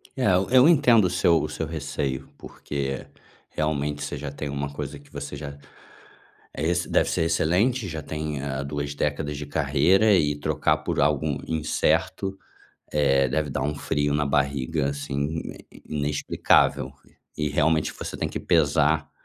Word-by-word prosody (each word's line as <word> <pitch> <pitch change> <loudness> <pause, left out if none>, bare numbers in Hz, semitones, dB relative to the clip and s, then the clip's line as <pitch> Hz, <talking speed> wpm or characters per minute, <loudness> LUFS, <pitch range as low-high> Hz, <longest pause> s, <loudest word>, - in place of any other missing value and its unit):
É, 130 - -1 0.3
eu 130 +2 +7
entendo 125 - +5
o - - +2
seu 85 -2 +3
o - - -3
seu 80 - -3
receio, 70 -3 -3
porque 70 -2 -5 0.4
realmente, 75 -1 -2
você 75 0 -4
já 70 0 -5
tem 75 +1 -5
uma 70 0 -3
coisa 70 0 -6
que 70 0 -21
você 70 0 -6
já 70 0 -6 1.0
eh 75 - -2
esse 85 0 -1
deve - - +2
ser 80 - +1
excelente, 100 +9 +1
já 80 -3 -5
tem, 75 -1 -4
eh, 70 -1 -3
2 70 0 -4
décadas 75 0 -2
de 75 - -5
carreira, 80 +9 +3
e 75 -5 +2
trocar 75 0 +1
por - - -3
algo 75 0 +2 0.2
incerto, 85 +5 0 0.5
eh 70 -2 +3
deve 75 +3 -1
dar - - -2
um 75 0 -1
frio 75 0 -1
na 75 0 +1
barriga, 70 +1 0
assim, 70 +2 -3 0.3
in - - -15
inexplicável. 75 -1 +1 0.5
E 75 -1 0
realmente 75 +2 +2
você - - -6
tem - - -2
que - - -5
pesar, 75 -1 +2
75 Hz, 160 wpm, -25 LUFS, 70-80 Hz, 1.0 s, eu